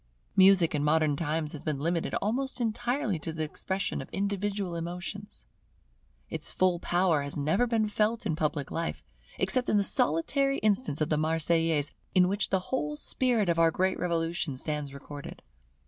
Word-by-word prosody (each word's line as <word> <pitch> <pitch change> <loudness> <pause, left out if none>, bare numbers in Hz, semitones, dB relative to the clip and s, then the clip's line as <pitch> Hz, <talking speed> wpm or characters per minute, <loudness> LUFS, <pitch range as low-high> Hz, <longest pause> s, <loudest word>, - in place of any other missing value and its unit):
Music 190 -4 +6
in 145 -1 0
modern 150 -1 +2
times 155 0 -1
has 150 - -6
been 155 -3 -1
limited 165 +3 -1
almost 260 +6 -1
entirely 240 - -1
to 160 - -5
the 160 0 -3
expression 190 +5 -3
of - - -10
individual 200 -1 -2
emotions. 180 +5 -6 0.8
Its - - -4
full 185 -2 +2
power 175 -4 +2
has 140 +1 -4
never 160 +12 +1
been 225 -2 +1
felt 215 +2 0
in 165 -7 0
public 150 -3 -2
life, 165 0 -3 0.3
except 255 -1 +1
in 210 - +3
the 200 - +3
solitary 275 - +2
instance 205 - +1
of 155 - +1
the 150 - +1
Marseillaise, 160 -1 +2 0.2
in 180 -1 +6
which 200 +2 +1
the 190 +5 -2
whole 300 +3 -1
spirit 245 -8 +1
of 170 -1 +1
our 165 0 +6
great 185 +3 0
Revolution 165 -4 -1
stands 150 0 -3
recorded. 140 +1 -9
175 Hz, 165 wpm, -29 LUFS, 155-205 Hz, 0.8 s, Music